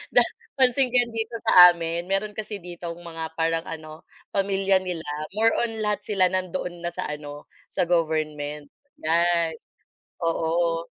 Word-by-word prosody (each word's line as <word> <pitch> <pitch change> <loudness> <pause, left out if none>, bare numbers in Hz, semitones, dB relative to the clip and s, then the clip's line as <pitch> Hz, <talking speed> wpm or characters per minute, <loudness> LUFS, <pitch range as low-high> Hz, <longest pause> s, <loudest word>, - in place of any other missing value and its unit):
da - - +7 0.3
pansin 260 0 +3
ko 250 - -5
'yan 240 -1 +2
dito 225 +1 -2
sa 180 -1 +10
amin 170 +1 -4
meron 200 +2 0
kasi 215 0 -5
ditong 175 -2 -7
mga 165 -2 -7
parang 165 0 0
ano, 155 0 -8 0.3
pamilya 195 -1 +2
nila 175 -3 -5 0.3
more 225 +1 +4
on 225 -2 -2
lahat 210 -1 0
sila 195 -3 +2
nandoon 180 -2 -3
na 175 - -2
sa - - -3
ano, 145 -1 -8 0.2
sa - - 0
government. 155 -3 -1 0.4
Yan, 170 0 +2 0.7
oo. 165 0 0
175 Hz, 145 wpm, -25 LUFS, 165-200 Hz, 0.7 s, sa